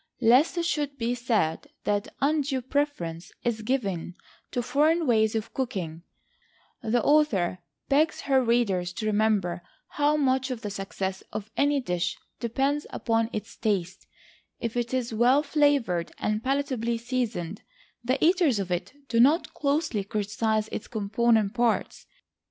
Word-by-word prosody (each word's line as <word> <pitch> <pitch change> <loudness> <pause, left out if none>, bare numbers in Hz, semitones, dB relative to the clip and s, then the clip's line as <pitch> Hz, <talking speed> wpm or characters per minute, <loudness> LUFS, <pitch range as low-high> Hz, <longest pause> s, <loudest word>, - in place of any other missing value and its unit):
Lest 255 +8 +4
it 340 - 0
should 290 -4 -1
be 235 -1 0
said 225 -10 0 0.2
that 205 0 -1
undue 280 -2 +1
preference 235 - -2
is 235 -2 -1
given 200 -8 -2 0.3
to 245 - -2
foreign 315 +6 +2
ways 220 -3 +3
of 220 0 -3
cooking, 180 -11 -3 0.8
the 235 +2 +1
author 225 - +3 0.3
begs 300 +3 +2
her 265 -2 +3
readers 200 -7 +1
to 220 +3 -4
remember 210 -5 +1 0.3
how 295 +1 +2
much 265 -2 +1
of 250 -3 -4
the 205 - -4
success 195 -1 -4
of 210 0 -6
any 285 0 +2
dish 180 -8 -2 0.2
depends 270 +5 0
upon 225 -1 0
its 215 - -6
taste; 190 -5 -2 0.5
if 230 0 -3
it 240 -1 -1
is 250 -3 -1
well 250 +6 +4
flavored, 285 - +2
and 215 +1 -1
palatably 260 -4 0
seasoned, 230 -7 -3 0.4
the 255 +3 +1
eaters 340 - +4
of 190 -2 -3
it 175 +7 -2
do 230 - +1
not 290 +8 +4
closely 285 -7 0
criticise 215 +1 -1
its 220 - -5
component 220 -1 +1
parts. 240 -2 0
235 Hz, 140 wpm, -27 LUFS, 205-275 Hz, 0.8 s, Lest